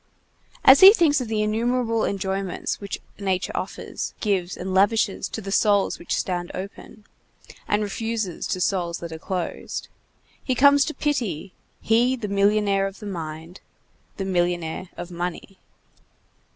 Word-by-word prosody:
As 265 +1 +9
he 385 +2 +11
thinks 310 - +3
of 245 - -4
the 215 -1 0
innumerable 230 +1 0
enjoyments 195 -1 -3
which 200 -1 -5 0.2
nature 190 -2 -1
offers, - - -5
gives, 190 -4 -1
and 185 +1 -4
lavishes 205 +1 +2
to 200 -3 -6
souls 205 0 +2
which 170 - -2
stand 175 -1 -2
open, 200 +2 -9 0.6
and 210 +1 +1
refuses 215 -3 -3
to 185 - -2
souls 175 -2 0
that 170 -1 -7
are 160 - -7
closed, 180 0 -4 0.5
he 255 - 0
comes 280 +2 +6
to 310 - -4
pity, 225 - -2 0.3
he 240 +3 +3
the 235 -4 -5
millionnaire 200 0 +2
of 195 0 -9
the 215 - -10
mind, 165 -2 -7 0.6
the 195 - -3
millionnaire 175 -1 -1
of 175 +1 -7
money. 180 +2 -5
200 Hz, 140 wpm, -24 LUFS, 180-225 Hz, 0.6 s, he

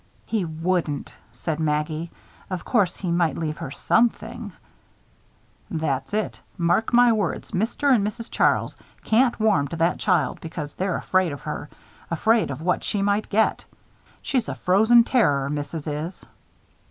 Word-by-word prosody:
"He 215 -5 -1
wouldn't," 160 -2 -2 0.2
said 150 +6 -4
Maggie. 155 +1 -1 0.4
"Of 185 -3 -4
course, 205 -8 +1
he 180 -3 -3
might 170 -4 +1
leave 155 -2 -3
her - - -5
something." 225 - 0 1.2
"That's 140 -4 -2
it. 215 - -2 0.2
Mark 175 +5 +1
my 245 0 +6
words, 210 -6 -1
Mr. 235 +8 +1
and 220 -5 +3
Mrs. 225 +3 -4
Charles - - +2 0.3
can't 240 +2 +3
warm 210 -10 +3
to 155 - -6
that 165 +2 +1
child 180 -6 +1
because 155 -3 -6
they're 185 -1 -1
afraid 185 -3 +1
of 140 - -7
her; 150 -1 -5 0.4
afraid 220 +6 +2
of 140 +3 -5
what 180 +1 +1
she 200 -2 -1
might 205 +1 0
get. 220 +1 +2 0.6
She's 255 -4 0
a - - -3
frozen 220 +6 +5
terror, 145 - +2
Missus 145 +1 -4
is." 155 +4 -5
180 Hz, 150 wpm, -24 LUFS, 155-220 Hz, 1.2 s, my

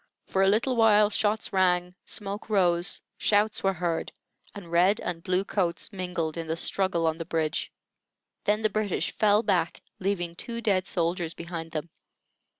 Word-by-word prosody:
For 190 - 0
a 195 - +5
little 230 +6 +2
while 215 -2 +5
shots 210 0 0
rang, 180 -1 +2
smoke 205 +1 -4
rose, 180 -3 +2 0.2
shouts 210 +1 +2
were 195 0 +2
heard, 170 -1 -2 0.4
and 185 -5 -9
red 180 +4 +4
and 170 -2 -4
blue 185 +2 0
coats 185 0 -1
mingled 180 -4 -3
in 165 -1 -4
the 160 - -1
struggle 185 -2 0
on 160 0 0
the - - -2
bridge. 160 -2 -1 0.7
Then 210 +1 +1
the 215 - +3
British 210 -3 -1
fell 210 +1 +3
back, 170 -5 0 0.2
leaving 180 -3 -1
two 235 +6 -5
dead 195 -5 +1
soldiers 170 -1 -1
behind 165 -1 -6
them. 155 +1 -4
185 Hz, 160 wpm, -27 LUFS, 170-205 Hz, 0.7 s, a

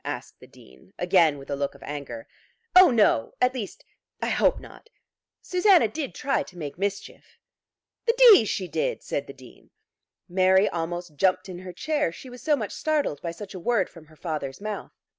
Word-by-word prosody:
asked - - -6
the - - -15
Dean, 65 0 -19
again 175 -5 +3
with 135 - -12
a - - 0
look 140 0 -3
of 140 - -15
anger. 140 -6 -7 0.5
"Oh 370 0 +9
no, 210 - +2
at 250 0 +3
least 225 -7 -7 0.3
I - - -2
hope - - +2
not. 460 - -15 0.5
Susanna 365 - +4
did 280 +5 -5
try 275 +1 0
to 180 - -10
make 145 -4 -6
mischief." 200 0 -5 0.7
"The 460 - +3
d 465 - +8
she 190 -2 -2
did," - - -2
said - - -3
the - - -9
Dean. - - -17 0.6
Mary 190 +2 +4
almost 170 -1 -4
jumped 190 +3 +2
in 180 -1 -7
her 185 0 -8
chair, 300 - -1
she 250 +9 -11
was 245 -1 -11
so 300 +3 +2
much 220 -7 -4
startled 295 - -1
by 170 - -4
such 190 +5 -8
a 185 - -7
word 205 +1 +1
from 165 -2 -14
her 155 - -19
father's 150 -5 -5
mouth. 210 0 -6
190 Hz, 190 wpm, -25 LUFS, 160-255 Hz, 0.7 s, Oh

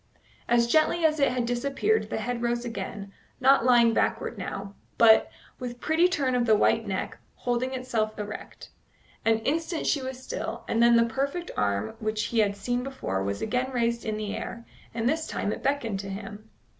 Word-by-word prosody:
As 235 0 +4
gently 315 +6 +3
as 310 -1 +3
it 275 - +3
had 250 -1 -1
disappeared 275 - 0
the - - -2
head 245 -1 -3
rose 240 0 -1
again, 200 -3 -6 0.3
not 265 -1 +5
lying 240 -2 +5
backward - - 0
now, 195 0 -6 0.2
but, 220 -1 +6 0.3
with 245 -1 -6
pretty 320 +6 +3
turn 280 -7 0
of 245 -1 +1
the 220 - +6
white 225 +1 +2
neck, 190 -1 -3 0.2
holding 250 +2 -1
itself 230 -4 -2
erect. 210 0 -8 0.5
An 225 0 +4
instant 325 +6 -1
she 285 - +1
was 260 0 -5
still, 485 - -5
and 230 - +1
then 235 0 +6
the 230 0 +5
perfect 280 +9 -2
arm 100 +1 0
which 215 0 -1
he 235 - 0
had 200 -2 +2
seen 245 +5 -1
before 255 - -3
was 100 +1 -2
again 250 +4 0
raised 235 -2 0
in 215 -1 -2
the 210 -1 -3
air, 235 0 -6 0.3
and 230 0 -1
this 315 +4 0
time 205 - -2
it - - -7
beckoned 240 -8 -1
to 195 0 -6
him. 205 +2 -8
235 Hz, 190 wpm, -27 LUFS, 215-260 Hz, 0.5 s, but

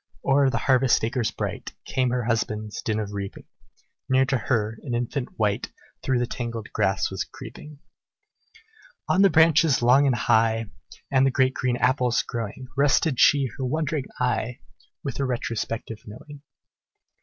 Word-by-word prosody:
O'er 140 0 +4
the - - -1
harvest 130 -3 +3
acres 115 0 0
bright, - - -5
Came 130 -1 0
her 125 0 -1
husband's 110 -2 -2
din 110 -1 -1
of 105 -1 -4
reaping; 100 -1 -6 0.7
Near 130 0 +4
to 135 +1 0
her, 110 -2 -1
an 125 -4 -4
infant 125 +2 -3
wight 105 -2 0 0.3
Through 130 -1 0
the 120 - +1
tangled 115 -2 -6
grass 95 0 +1
was 95 - -2
creeping. 150 -1 -11 1.3
On 190 - +3
the 195 - +6
branches 160 -4 +4
long 135 +4 +5
and 130 - +2
high, 115 -2 +2 0.4
And 130 -1 +4
the 135 - +4
great 130 0 +2
green 125 -2 -1
apples 125 -1 +2
growing, 115 +2 -5
Rested 140 0 +2
she 140 -2 +5
her - - -2
wandering 150 +1 -1
eye, 125 -1 -1 0.4
With 140 -3 -4
a - - +1
retrospective 115 -3 -3
knowing. 140 +7 -11
125 Hz, 155 wpm, -25 LUFS, 115-135 Hz, 1.3 s, the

